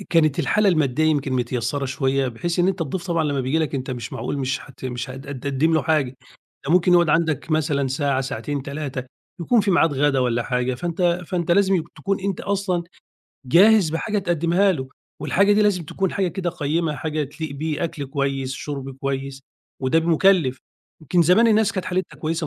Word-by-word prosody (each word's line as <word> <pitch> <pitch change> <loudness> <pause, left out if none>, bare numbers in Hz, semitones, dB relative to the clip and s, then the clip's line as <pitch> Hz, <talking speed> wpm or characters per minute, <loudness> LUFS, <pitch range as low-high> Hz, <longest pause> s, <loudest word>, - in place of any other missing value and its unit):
آآ - - -8
كانت 155 -4 +3
الحالة 210 -1 +2
المادّية 155 -4 +2
يمكن 145 -4 +1
متيسّرة 125 +2 -1
شوية 135 0 0
بحيث 170 +10 -3
إن 180 +2 +3
أنت 190 -1 -2
الضيف 170 +4 -4
طبعًا 165 -2 0
لمّا 140 -2 0
بييجي 130 +5 0
لك 155 -3 -1
أنت 130 -1 -3
مش 120 -4 -6
معقول 145 - -3
مش 135 0 -1
حت 130 -2 -13
مش 125 0 -4
هد 135 +1 -9
هد 140 - -5
هتقدّم 145 +4 +1
له 160 - +2
حاجة، 140 -5 0 0.5
ده 150 - +1
ممكن 180 0 +4
يقعد 175 -2 +5
عندك 160 -1 +1
مثلًا 145 -3 +1
ساعة، 140 0 0
ساعتين، 135 +1 -4
3، 140 -2 -5 0.4
يكون 230 +7 +3
في 200 -1 0
ميعاد 165 -4 +3
غَدا 140 0 +2
والّا 120 -2 +1
حاجة، 125 +1 -1
فأنت 175 +4 -1
فأنت 175 -1 -2
لازم 195 +1 +3
ي 165 - -2
تكون 195 -1 -2
أنت 195 -1 -2
أصلًا 195 -3 -1 0.6
جاهز 190 - +5
بحاجة 210 +6 -1
تقدّمها 175 +2 +2
له، 130 -6 -5 0.3
والحاجة 200 +2 +3
دي 210 +1 +4
لازم 200 -4 +2
تكون 190 +4 -2
حاجة 195 -2 0
كده 175 0 -3
قيّمة 155 -1 -1
حاجة 155 +1 -2
تليق 155 +2 -7
بيه، 150 +2 -3
أكل 145 -4 -4
كويس، 135 -1 -2
شُرْب 140 -2 -5
كويس 135 0 -3 0.4
وده 135 +5 +2
مُكلِّف. 165 -4 +3 0.4
يمكن 170 +3 +2
زمان 185 +8 +5
الناس 220 -1 +3
كانت 185 -4 -3
حالتها 185 +1 -3
كويسة 160 0 -2
155 Hz, 195 wpm, -22 LUFS, 135-175 Hz, 0.6 s, يقعد